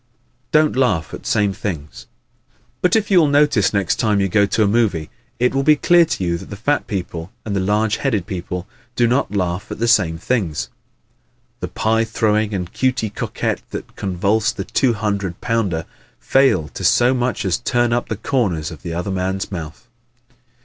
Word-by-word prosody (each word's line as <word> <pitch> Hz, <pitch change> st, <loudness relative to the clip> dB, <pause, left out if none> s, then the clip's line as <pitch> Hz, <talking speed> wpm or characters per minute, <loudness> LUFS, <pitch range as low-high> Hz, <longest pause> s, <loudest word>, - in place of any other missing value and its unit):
Don't 155 Hz, -2 st, +3 dB
Laugh 110 Hz, -12 st, +1 dB
at -, -, -7 dB
Same 100 Hz, -2 st, +2 dB
Things 85 Hz, -7 st, -6 dB, 0.6 s
¶ -, -, -36 dB
But 180 Hz, -, +3 dB
if 210 Hz, -2 st, +1 dB
you 185 Hz, -, +7 dB
will 160 Hz, -, +4 dB
notice 145 Hz, -8 st, +3 dB
next 100 Hz, -3 st, 0 dB
time 105 Hz, -3 st, +2 dB
you 95 Hz, -1 st, +1 dB
go 100 Hz, +2 st, +3 dB
to 110 Hz, -, +1 dB
a -, -, +3 dB
movie 100 Hz, -8 st, +1 dB, 0.3 s
it 125 Hz, +1 st, +2 dB
will 135 Hz, -, +1 dB
be 150 Hz, +2 st, +5 dB
clear 175 Hz, +3 st, +5 dB
to 95 Hz, -, -3 dB
you 85 Hz, -1 st, 0 dB
that -, -, -11 dB
the 100 Hz, -, -6 dB
fat 140 Hz, +8 st, 0 dB
people 90 Hz, -4 st, -5 dB
and 105 Hz, -2 st, -2 dB
the -, -, +1 dB
large 105 Hz, +3 st, +1 dB
headed 110 Hz, -10 st, -1 dB
people 90 Hz, -1 st, -5 dB, 0.3 s
do 120 Hz, -, +3 dB
not 120 Hz, -2 st, +1 dB
laugh 90 Hz, 0 st, -1 dB
at -, -, -5 dB
the 115 Hz, -, 0 dB
same 95 Hz, -8 st, +3 dB
things. 95 Hz, -6 st, -1 dB, 0.9 s
The -, -, -3 dB
pie 115 Hz, +1 st, +1 dB
throwing 110 Hz, -1 st, +1 dB
and 90 Hz, -4 st, -4 dB
Cutey 125 Hz, -5 st, 0 dB
Coquette -, -, -3 dB
that -, -, -7 dB
convulse 100 Hz, +3 st, 0 dB
the 95 Hz, -, -6 dB
two 125 Hz, -3 st, +2 dB
hundred 100 Hz, -4 st, -2 dB
pounder 100 Hz, -9 st, -1 dB, 0.3 s
fail 135 Hz, -, +3 dB
to -, -, -8 dB
so 120 Hz, +7 st, +4 dB
much 125 Hz, -4 st, -1 dB
as 90 Hz, -3 st, +1 dB
turn 120 Hz, 0 st, +1 dB
up 120 Hz, -, -1 dB
the 110 Hz, -, -2 dB
corners 95 Hz, -, -1 dB
of 80 Hz, -, -10 dB
the 85 Hz, -2 st, -5 dB
other 90 Hz, +3 st, -3 dB
man's 95 Hz, +1 st, -2 dB
mouth. 85 Hz, +5 st, -7 dB
105 Hz, 190 wpm, -20 LUFS, 90-120 Hz, 0.9 s, you